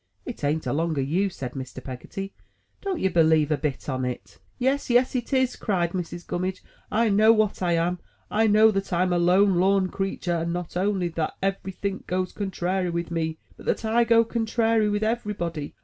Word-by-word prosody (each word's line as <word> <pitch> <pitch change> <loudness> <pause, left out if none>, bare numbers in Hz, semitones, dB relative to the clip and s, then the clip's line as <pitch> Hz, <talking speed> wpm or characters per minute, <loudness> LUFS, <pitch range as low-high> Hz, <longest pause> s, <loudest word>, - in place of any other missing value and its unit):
It 245 - -7
an't 150 +2 0
along 160 +1 0
o' - - +2
you!" 175 +9 +1
said 130 -8 -6
Mr. 130 -1 -7
Peggotty. 195 +10 -7 0.5
"Don't 390 -3 -2
ye - - +2
believe 160 -4 +3
a - - +4
bit 150 -3 -3
on 130 -2 -2
it." 125 -1 -5 0.2
'*Yes, 265 +2 0
yes, 245 +2 +3
it 245 -2 -2
is," 260 -2 +2
cried 175 -6 0
Mrs. 175 -1 -5
Gimimidge. 185 +1 -3 0.3
"I 225 +1 +2
know 215 +2 +6
what 215 -3 +1
I 175 -2 +2
am. 170 +2 0 0.3
I 220 +1 +3
know 215 +1 +6
that 195 -1 -1
Tm 180 0 0
a 175 - +2
lone 185 +2 +4
lorn 190 0 +3
creetur, 185 -3 -2
and 170 +1 -2
not 175 -1 -4
only 185 -1 0
that 165 -1 -3
every 195 0 -1
think 195 +1 -4
goes 185 0 -1
contrairy 190 -2 -1
with 170 0 -3
me, 160 -1 -2 0.2
but - - -13
that - - 0
I 230 +2 +3
go 230 0 +5
contrairy 225 -1 +1
with 205 +1 0
everybody. 205 -9 -2
185 Hz, 195 wpm, -25 LUFS, 170-215 Hz, 0.5 s, know